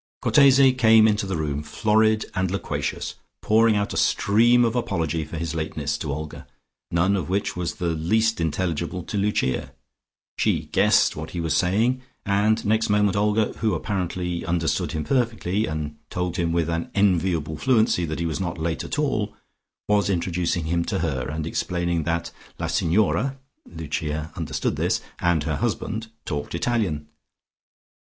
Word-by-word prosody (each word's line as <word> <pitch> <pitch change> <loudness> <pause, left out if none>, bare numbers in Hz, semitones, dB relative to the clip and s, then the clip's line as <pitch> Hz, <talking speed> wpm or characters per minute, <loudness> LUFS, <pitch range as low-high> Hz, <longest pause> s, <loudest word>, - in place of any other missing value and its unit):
Cortese 135 -2 +6
came 110 -3 +6
into 105 -2 +1
the 95 - -2
room, 75 -2 -2
florid 110 +6 +2
and 95 0 0
loquacious, 100 +2 -3 0.3
pouring 110 0 +4
out 100 0 -1
a - - -3
stream 120 +4 +4
of 115 +1 -1
apology 85 - -1
for 80 +2 -7
his 85 0 -3
lateness 75 -2 -2
to 75 - -3
Olga, 75 +2 -6 0.4
none 90 +4 +2
of 90 -4 -3
which 100 +2 -1
was 90 -1 -3
the 85 - -2
least 100 +6 +1
intelligible 85 +1 -2
to - - -6
Lucia. 100 -10 0 0.7
She - - +1
guessed - - +4
what 80 +1 -6
he - - -1
was 80 -3 0
saying, 110 +8 +2 0.2
and 105 +2 +2
next 110 +2 +2
moment 105 -1 +3
Olga, 105 +1 +1
who 110 -2 +1
apparently 90 -3 -2
understood 85 -1 -1
him 75 - -2
perfectly, 115 -6 0
and 75 -1 -4
told 90 -1 -2
him 85 -2 0
with 85 -1 +1
an 85 0 -2
enviable 90 -6 +1
fluency 110 - +2
that 80 -1 -4
he 85 - -2
was 80 +2 -2
not 85 -3 -3
late 80 0 -2
at - - -4
all, 110 -8 -1 0.5
was 105 -1 +2
introducing 85 -2 -1
him 85 +1 0
to - - -1
her, 70 -7 -1
and 75 0 -3
explaining 85 -1 -1
that 85 0 -1 0.3
"la - - -3
Signora" 110 +9 +1 0.3
(Lucia 80 -1 -4
understood - - -2
this) - - +1 0.2
and 85 -3 +2
her 75 -2 -1
husband 110 +9 -2 0.2
talked 75 0 -4
Italian. 85 -8 -1
90 Hz, 160 wpm, -24 LUFS, 80-110 Hz, 0.7 s, Cortese